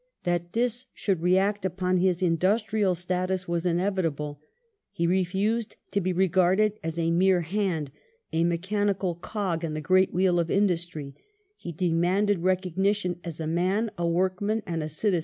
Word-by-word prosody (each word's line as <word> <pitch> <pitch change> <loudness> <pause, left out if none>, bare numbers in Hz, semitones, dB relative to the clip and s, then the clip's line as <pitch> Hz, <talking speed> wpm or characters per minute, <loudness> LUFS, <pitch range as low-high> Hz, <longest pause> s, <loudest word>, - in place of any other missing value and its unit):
That 175 0 -1
this 245 +2 0
should 190 -5 -1
react 190 +3 +2
upon 185 0 0
his 180 0 +1
industrial 195 +3 +2
status 185 +1 -2
was 170 +1 -1
inevitable. 165 -5 -1 0.5
He 170 - -1
refused 190 +5 0 0.2
to 200 - +1
be 185 +1 0
regarded 190 +3 +2
as 165 0 -4
a 165 0 +1
mere 180 +1 +3
"hand," 170 -5 -2 0.4
a 165 +1 +2
mechanical 190 +2 0
cog 175 -1 -3
in 155 -2 -3
the - - -2
great 185 +4 +3
wheel 180 -1 +2
of 170 -1 0
industry; 170 -7 0 0.4
he 175 - -7
demanded 180 +4 +1
recognition 185 +1 0
as 165 -2 -6
a 160 - -3
man, 185 +7 0
a 170 0 -1
workman, 190 +5 0
and 165 -3 -3
a 155 - -4
citizen. 180 +4 0
180 Hz, 155 wpm, -26 LUFS, 170-195 Hz, 0.5 s, mere